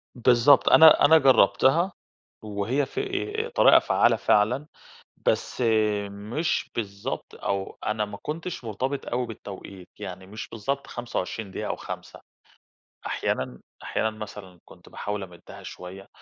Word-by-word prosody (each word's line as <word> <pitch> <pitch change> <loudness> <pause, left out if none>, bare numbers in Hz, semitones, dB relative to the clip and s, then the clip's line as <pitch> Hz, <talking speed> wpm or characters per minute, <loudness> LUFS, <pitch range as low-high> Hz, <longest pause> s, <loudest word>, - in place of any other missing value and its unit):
بالضبط، 125 +3 +5
أنا 160 -2 +8
أنا 160 +2 +7
جربتها 135 - +4 0.5
وهي 110 +7 -1
ف - - -6 0.6
طريقة - - +7
فعالة - - +3
فعلًا. 120 +8 +2 0.6
بس - - 0 0.5
مش 105 +11 -2
بالضبط، 100 -3 -5
أو 100 -1 -3
أنا 105 0 0
ما 105 -1 -9
كنتش 165 0 -5
مرتبط 130 +6 -3
أوي 125 +1 -1
بالتوقيت، 100 -4 -10
يعني 95 -2 -8
مش 110 +3 -8
بالضبط 135 +6 -3
25 115 -4 -5
دقيقة - - -3
و5، - - -8 0.9
أحيانًا 65 -1 -2 0.2
أحيانًا 110 - -1
مثلًا 100 -5 -10
كنت - - -17
باحاول 105 0 -4
أمدّها 90 -3 -12
شوية، 95 +2 -10
110 Hz, 120 wpm, -25 LUFS, 100-130 Hz, 0.9 s, أنا